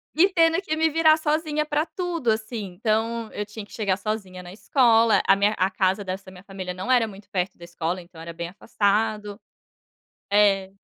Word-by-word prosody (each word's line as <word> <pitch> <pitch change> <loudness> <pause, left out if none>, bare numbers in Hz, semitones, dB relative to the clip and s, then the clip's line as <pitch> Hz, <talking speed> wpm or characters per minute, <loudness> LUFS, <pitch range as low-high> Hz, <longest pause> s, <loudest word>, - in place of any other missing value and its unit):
E 355 +5 +5
tendo 330 +1 +3
que 310 -5 -2
me 320 0 +2
virar 315 0 +4
sozinha 305 0 0
para 300 +1 0
tudo, 340 -11 -2
assim. 220 0 -3
Então, 225 +3 -1
eu 210 - -3
tinha 210 0 -9
que - - -24
chegar 200 -4 0
sozinha 200 -3 -4
na 175 0 -11
escola, 230 0 +3
a 195 - +6
minha 205 +2 +2
a 185 +1 +2
casa 190 +1 0
dessa 190 +1 -5
da 185 - -11
minha 180 0 -14
família 190 -2 -6
não 185 +8 -3
era 245 -3 +4
muito 200 0 -13
perto 185 -2 -2
da 175 - -14
escola, 175 +1 -3
então, 170 -1 -16
era 165 0 -8
bem 170 +1 -5
afastado. 210 +1 -1 0.9
É. 200 -2 +3
210 Hz, 200 wpm, -24 LUFS, 190-250 Hz, 0.9 s, a